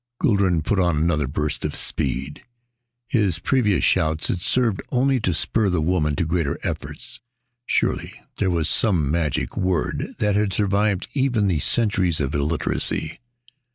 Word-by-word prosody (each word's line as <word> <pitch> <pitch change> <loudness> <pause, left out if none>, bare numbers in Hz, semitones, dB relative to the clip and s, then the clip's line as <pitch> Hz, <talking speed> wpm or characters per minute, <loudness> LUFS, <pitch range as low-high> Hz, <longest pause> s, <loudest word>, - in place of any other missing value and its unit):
Guldran 100 - +2
put 100 +5 0
on 85 -4 +2
another 75 -3 +1
burst 75 +2 -3
of - - -2
speed. 65 +3 -3 0.7
His 105 - +1
previous 105 +2 +1
shouts 80 -3 +1
had 90 - -1
served 115 -2 +1
only 130 +1 +2
to 95 - 0
spur 100 +5 +1
the 90 -2 +1
woman 80 -2 +1
to 85 - 0
greater 80 -3 -1
efforts. - - -6 0.5
Surely - - -1 0.2
there 95 - +1
was 85 -3 0
some 85 - +1
magic 80 -4 -1
word 90 -4 -1
that 105 -1 +1
had 105 -2 +1
survived 100 -1 +1
even 130 -6 +1
the 90 -6 +1
centuries 95 - +1
of 70 -1 -1
illiteracy. 75 +1 -1
90 Hz, 150 wpm, -23 LUFS, 80-105 Hz, 0.7 s, Guldran